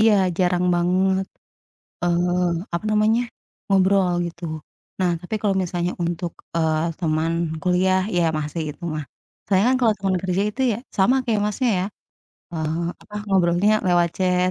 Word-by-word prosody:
iya 220 -1 +6 0.2
jarang 180 0 +2
banget, 190 +2 +1 0.8
eee, 175 +1 +1 0.2
apa 170 - -2
namanya, 215 +2 +3 0.5
ngobrol 190 -1 +3
gitu. 170 +1 -14 0.6
Nah, 180 -1 +3
tapi 180 +5 -5
kalau 205 -2 +2
misalnya 175 0 -2
untuk, 170 0 -3 0.2
eee, 160 0 +1
teman 160 -1 0 0.3
kuliah, 185 +1 +2
iya 175 -1 +2
masih 155 +2 -3
itu - - -31
mah. 150 -1 -3 0.4
Soalnya 195 0 +3
kan - - +3
kalau 225 -3 +4
teman 190 -1 0
kerja 190 +1 0
itu 235 - -8 0.2
ya, - - -7 0.2
sama 220 +7 +4
kayak 225 -4 +1
Masnya 210 +4 0
ya, 185 - 0 0.7
eee, 160 +1 -2 0.2
apa, 210 - -15
ngobrolnya 185 +1 +3 0.2
lewat 175 -1 +4
chat 180 -1 +2
180 Hz, 150 wpm, -22 LUFS, 170-195 Hz, 0.8 s, iya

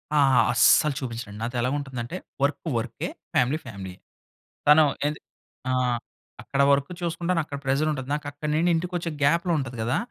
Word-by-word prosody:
ఆ! - - +4 0.3
అస్సలు 145 +5 +5
చూపించనండి. 115 -5 -6
నాతో 120 +2 -3
ఎలా 125 - +1
ఉంటుందంటే 130 +2 -5 0.3
వర్క్ 140 0 +1 0.2
వర్కే, 115 - -3 0.3
ఫ్యామిలీ 130 +5 +3
ఫ్యామిలీయే. 95 -6 -8 0.7
తను 150 +1 +8 0.2
ఏంది 150 0 -2 0.5
ఆహ్, 125 -2 +1 0.4
అక్కడ 140 - -2
వర్క్ 140 0 +2
చూసుకుంటాను, 170 0 0
అక్కడ 145 - -6
ప్రెషర్ 135 +3 +1
ఉంటది. 130 -3 -5
నాకు 150 -1 -4
అక్కడ 145 +1 -6
నుండి 170 +3 +2
ఇంటికొచ్చే 175 0 -2
గ్యాప్‌లో 170 +5 +3
ఉంటుంది 125 -3 -4
కదా! 120 +3 0
140 Hz, 155 wpm, -25 LUFS, 125-155 Hz, 0.7 s, తను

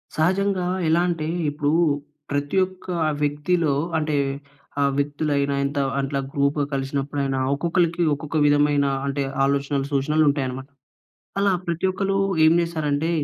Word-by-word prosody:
సహజంగా 185 +3 +1 0.2
ఎలా 165 +2 +3
అంటే, 165 -3 -2 0.2
ఇప్పుడు 145 0 -1 0.6
ప్రతి 145 +5 -1
ఒక్క 185 0 -15 0.4
వ్యక్తిలో 150 +1 +1 0.2
అంటే, 155 -1 -1 0.7
ఆ - - +4
వ్యక్తులైన 145 0 0
ఇంత 140 +1 -3 0.2
అట్లా 135 0 -2
గ్రూప్‌గా 140 +1 +1
కలిసినప్పుడయినా 135 0 -2
ఒక్కొక్కళ్ళకి, 170 +3 +1
ఒక్కొక్క 145 +2 -3
విధమైన 145 0 +3 0.2
అంటే 140 0 -1 0.2
ఆలోచనలు, 140 0 0
సూచనలు 150 +3 +2
ఉంటాయి 140 -1 0
అన్నమాట. 130 +2 -7 0.7
అలా 200 -1 +3
ప్రతి 170 +1 -1
ఒక్కళ్ళు 195 +1 0 0.3
ఏమి 160 +1 +5
చేస్తారంటే, 160 -2 -1
145 Hz, 120 wpm, -23 LUFS, 140-165 Hz, 0.7 s, ఏమి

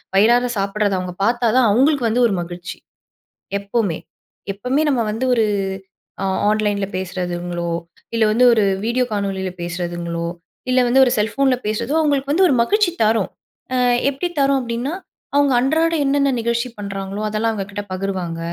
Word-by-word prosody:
வயிறார 240 +5 +4
சாப்பிடுறத 200 +1 0
அவங்க 180 -1 -5
பார்த்தா 240 0 +1
தான் 250 -3 +5
அவங்களுக்கு 265 +1 +3
வந்து 240 +2 +3
ஒரு 195 - 0
மகிழ்ச்சி. 175 +1 -7 0.8
எப்பவுமே 200 -5 -1 0.5
எப்பவுமே 250 +9 -1
நம்ம 250 -4 +1
வந்து 235 +4 -2
ஒரு 225 -2 +3 0.8
ஆ - - 0 0.2
ஆன்லைன்ல 210 -2 +1
பேசுறதுங்களோ, 175 -2 -3 0.4
இல்லை 225 -1 +3
வந்து 245 +3 +4
ஒரு 215 -2 +3 0.2
வீடியோ 250 +2 +1
காணொளியில 195 -2 -2
பேசுறதுங்களோ, 170 -1 -3 0.4
இல்ல 255 0 +3
வந்து 265 +2 +5
ஒரு 245 - +1
செல்ஃபோன்ல 255 +5 +2
பேசுறதோ 230 +7 -1
அவங்களுக்கு 285 -2 +1
வந்து 370 +5 +4
ஒரு 280 - +2
மகிழ்ச்சி 410 - +2
தரும். 215 -2 +2 0.4
அ - - +1 0.3
எப்படி 280 +6 -2
தரும் 275 0 +3
அப்படின்னா 240 +5 -3 0.4
அவங்க 285 -2 +4
அன்றாட 320 +5 +2
என்னென்ன 280 0 +2
நிகழ்ச்சி 235 +2 -1
பண்ணுறாங்களோ 195 0 -5
அதெல்லாம் 215 +2 0
அவங்க 200 -3 -3
கிட்ட 205 +1 -4
பகிர்வாங்க. 185 -3 -3
220 Hz, 150 wpm, -20 LUFS, 195-255 Hz, 0.8 s, தான்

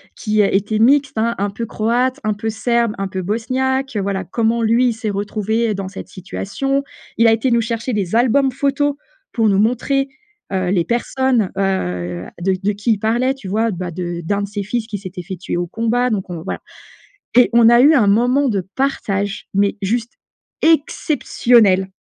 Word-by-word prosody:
qui, 215 -1 +1
heu, 200 - +4
était 210 +2 0
mixte, 270 +3 +3
hein, 230 +1 +1
un 200 +1 -1
peu 220 +4 -5
croate, 245 +5 0
un 215 - +1
peu 220 +2 -4
serbe, 235 0 0
un 195 0 -3
peu 190 0 -4
bosniaque, 255 +5 -1
heu - - +1
voilà, 195 -1 -2
comment 230 +5 0
lui 235 +2 +3
s'est 225 -1 -4
retrouvé, 210 +3 -1
heu, - - 0
dans 195 -1 -5
cette 195 - -9
situation. 270 +9 -3 0.3
Il 230 - +5
a 225 - +6
été 230 +3 0
nous 235 - +4
chercher 230 +2 -2
des 205 -3 -1
albums 260 +3 +3
photos 280 +2 0 0.4
pour 225 -2 +2
nous 195 -1 +2
montrer, 255 +5 +1 0.5
heu, 185 -1 0
les 180 -3 +1
personnes, 240 -2 0
heu, 90 - -2
de 190 +1 +1
de 205 - +2
qui 205 +3 -1
il 205 - -4
parlait. 240 +5 +1
Tu 265 -8 -9
vois? 220 +3 +1
Bah 180 -2 -5
de 175 0 -4
d'1 200 +4 -1
de - - -3
ses 205 0 -4
fils 220 +3 -3
qui 210 -3 -4
s'était 185 -2 -8
fait 190 +2 -6
tuer 180 0 -4
au 175 0 -2
combat. 230 +5 0
Donc 195 -5 -2
on 170 -2 -5
voilà. - - -5 0.7
Et 250 0 +6
on 235 -1 +6
a 240 +1 +6
eu 300 +4 +6
un 235 -8 +4
moment 250 +7 +3
de 195 -5 -1
partage, 205 -7 -1
mais 200 +2 +1
juste 235 +4 -1 0.5
exceptionnel 240 - +3
220 Hz, 195 wpm, -18 LUFS, 195-245 Hz, 0.7 s, a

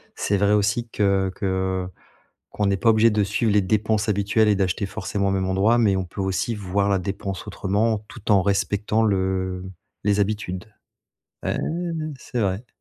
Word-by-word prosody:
C'est 100 - 0
vrai 100 +1 +2
aussi 105 +3 +1
que 100 -3 +1
que 95 -1 -1 0.6
qu'on 105 - 0
n'est 100 0 +2
pas 115 - +3
obligé 110 +1 +5
de 105 -1 +1
suivre 105 +3 0
les 105 0 +4
dépenses 105 +2 +1
habituelles, 105 +2 +2
et 105 - +4
d'acheter 95 0 0
forcément 100 0 -2
au - - 0
même 95 -1 0
endroit, 100 +5 +3
mais 105 -4 +3
on 95 - -2
peut 95 +3 -6
aussi 95 +4 -1
voir 100 0 -1
la 100 -1 +2
dépense 95 +1 -4
autrement, 105 +2 0
tout 110 -1 -4
en 100 -2 +6
respectant 100 +2 +1
le 95 -2 0 0.4
les 105 0 +2
habitudes. 100 -3 -2 0.8
Hein, - - -1 0.6
c'est 125 - -4
vrai. 100 +3 -1
100 Hz, 175 wpm, -23 LUFS, 95-105 Hz, 0.8 s, en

